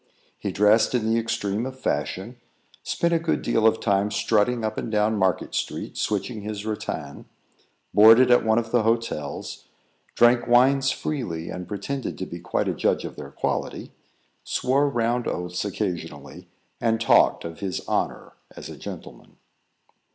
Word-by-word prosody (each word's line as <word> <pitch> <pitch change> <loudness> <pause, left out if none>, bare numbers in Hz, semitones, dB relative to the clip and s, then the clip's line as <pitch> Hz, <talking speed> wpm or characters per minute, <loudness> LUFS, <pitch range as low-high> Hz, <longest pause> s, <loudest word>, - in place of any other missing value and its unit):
He - - -3
dressed 105 +4 +3
in 110 -2 +1
the 115 - +3
extreme 115 -2 -2
of 130 0 -9
fashion; 95 - -3 0.4
spent 170 0 0
a 165 - +3
good 165 0 -1
deal 110 0 +3
of 110 - +2
time 100 -1 +1
strutting 110 +2 +1
up 110 0 -2
and 115 - -5
down 105 +1 +2
Market 95 -3 0
street, - - -3
switching 105 +2 -2
his 105 0 -5
rattan; 110 -1 -5 0.7
boarded 115 +4 +7
at 125 - +5
one 110 0 +2
of 115 -1 -1
the 120 - +3
hotels; 115 -10 -2 0.5
drank 120 0 +4
wines 135 +3 +4
freely, 115 - -3
and 90 -1 -6
pretended 135 +7 -4
to 95 - -4
be 85 - -8
quite 85 - -2
a - - 0
judge - - 0
of - - -7
their - - -8
quality; - - -3 0.5
swore 140 +3 +1
round 120 -1 0
oaths 90 0 -3
occasionally, 95 -3 -5 0.3
and 115 -1 +1
talked 115 - +4
of 85 0 -7
his 95 -2 -4
honour - - -2 0.2
as - - -9
a - - -9
gentleman. - - -10
110 Hz, 160 wpm, -24 LUFS, 100-120 Hz, 0.7 s, boarded